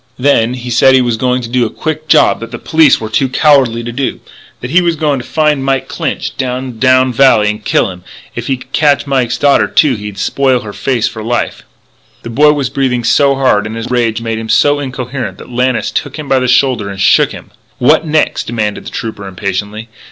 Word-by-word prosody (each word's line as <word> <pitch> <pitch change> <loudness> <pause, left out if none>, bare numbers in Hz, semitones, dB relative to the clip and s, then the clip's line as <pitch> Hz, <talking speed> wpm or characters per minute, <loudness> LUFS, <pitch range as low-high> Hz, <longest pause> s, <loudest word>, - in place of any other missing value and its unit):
Then 125 -3 +2
he 125 -1 -7
said 130 +3 +4
he 130 - +4
was 120 -2 0
going 125 +2 -1
to - - -5
do 125 +1 0
a 115 - -1
quick 155 +3 -5
job - - +4
that 115 - -7
the - - -7
police 155 -3 +3
were 110 - -5
too 130 +4 0
cowardly 130 -5 +2
to 120 - -5
do; 130 +3 -3 0.4
that 120 - -7
he 180 +3 +4
was 170 -2 0
a - - -15
going 145 -3 0
to - - -7
find 150 -3 0
Mike 135 -1 -1
Clinch - - -4
down 130 0 -3
to 110 - -16
Drowned 130 0 +3
Valley 115 -5 +4
and 105 0 -9
kill 95 - +1
him; 90 - -11
and - - -25 0.3
if 120 0 -6
he 135 - 0
could 125 +1 -16
catch 145 -2 +2
Mike's 125 -3 0
daughter, 140 0 +3
too, 150 -4 +3
he'd 105 -3 -7
spoil 130 +4 +1
her 105 -1 -8
face 125 -1 -1
for 110 - -7
life 120 +2 -2 0.3
" - - -35
The 115 - -7
boy 150 +5 +4
was 140 -4 -2
breathing 130 -3 -1
so 140 +3 +3
hard 130 -6 +1
and 110 - -7
his 115 +2 -6
rage 115 -2 0
made 115 -1 -3
him 110 0 -7
so 145 +4 +3
incoherent 130 -1 -5
that - - -12
Lannis 125 0 0
took 145 +1 -4
him 150 -2 -7
by 135 -1 +2
the 130 - -1
shoulder 125 -4 +2
and 100 -1 -8
shook 105 +3 +3
him: - - -11 0.3
"What - - +3
next?" 155 -1 0
demanded 110 -3 -3
the - - -4
Trooper 110 -4 -6
impatiently. 100 +3 -4
125 Hz, 235 wpm, -13 LUFS, 115-135 Hz, 0.4 s, said